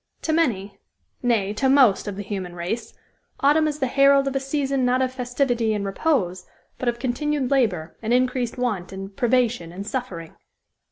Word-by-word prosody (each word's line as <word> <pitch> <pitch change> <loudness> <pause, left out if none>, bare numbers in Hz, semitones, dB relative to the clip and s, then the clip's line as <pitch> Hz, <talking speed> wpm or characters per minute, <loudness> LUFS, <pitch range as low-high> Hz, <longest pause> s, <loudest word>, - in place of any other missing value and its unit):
To 315 - 0
many 205 - 0 0.4
nay, 220 -5 +1
to 265 +5 +1
most 260 -8 +4
of 205 - -4
the 205 - -5
human 190 -3 -5
race 180 +7 -4 0.5
autumn 300 +3 +4
is 300 -1 -2
the 275 - 0
herald 275 +1 +4
of 275 - -2
a - - +2
season 275 -1 -1
not 250 +1 +2
of 260 -1 0
festivity 245 -3 0
and 200 -1 -2
repose, 195 - -1 0.3
but 250 - +1
of 240 - -2
continued 265 +2 -1
labor, 200 -12 +1
and 225 0 -3
increased 250 -1 +1
want 215 -9 -2
and 195 +1 -8
privation 240 -7 +1
and 190 +3 -7
suffering." 205 -9 -5
245 Hz, 175 wpm, -23 LUFS, 200-270 Hz, 0.5 s, most